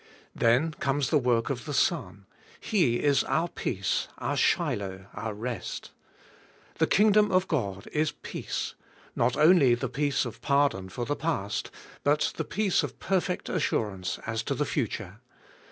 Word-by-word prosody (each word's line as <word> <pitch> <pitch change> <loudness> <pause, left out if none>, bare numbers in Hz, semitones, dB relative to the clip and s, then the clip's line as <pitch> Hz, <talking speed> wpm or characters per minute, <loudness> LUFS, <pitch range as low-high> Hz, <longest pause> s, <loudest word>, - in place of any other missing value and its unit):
Then 125 +8 +3
comes 140 -2 -1
the 150 - +5
work 120 -1 +1
of 125 -3 -4
the 145 - -3
Son: 105 - 0 0.3
He 170 - +2
is 145 -1 +4
our 170 - +1
peace, 95 - -2
our - - -2
Shiloh, 95 -1 0
our 110 -2 -4
rest. 115 -2 -5 0.9
The - - +4
King 210 +1 +5
dom 210 0 +4
of 185 0 +3
God 100 - -2
is 155 0 +1
peace; - - -5 0.4
notonlj^the 135 -3 +4
peace 145 -1 +1
of 120 - -7
pardon 140 -10 +1
for 120 +6 -4
the 145 - -1
past, 125 -13 -2 0.3
but 145 +1 +2
the 160 - -1
peace 205 +1 +1
of - - -5
perfect 185 -1 -1
assurance 100 - -1
as 110 +1 -2
to - - -2
the - - 0
future. - - -3
135 Hz, 150 wpm, -28 LUFS, 110-160 Hz, 0.9 s, the